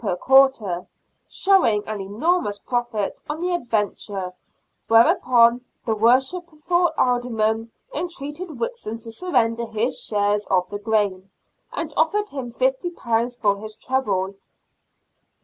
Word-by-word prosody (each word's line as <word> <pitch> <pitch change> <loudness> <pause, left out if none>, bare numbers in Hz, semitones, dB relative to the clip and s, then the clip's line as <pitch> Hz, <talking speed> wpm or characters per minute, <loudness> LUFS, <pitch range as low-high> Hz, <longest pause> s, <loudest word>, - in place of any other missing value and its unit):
per 195 -5 0
quarter, 240 -7 +3 0.4
showing 360 - +3
an 215 -2 -4
enormous 210 - 0
profit 235 -2 -2
on 300 +1 -3
the 360 +1 -1
adventure, 205 - -2 0.5
whereupon 235 +1 +5 0.2
the 225 - +1
worshipful 310 +9 +2
Aldermen 225 -2 +1 0.2
entreated 335 -1 -4
Whitson 465 - -3
to 225 0 -9
surrender 235 -6 0
his 225 +4 -1
share 205 -1 +1
of 180 -1 +2
the 205 - -4
gain, 205 -3 0 0.4
and 310 -2 -4
offered 415 +7 +1
him 260 -4 -5
£50 250 -3 -1
for 200 -3 +2
his 215 0 -7
trouble. 205 -8 -1
235 Hz, 115 wpm, -22 LUFS, 210-295 Hz, 0.5 s, whereupon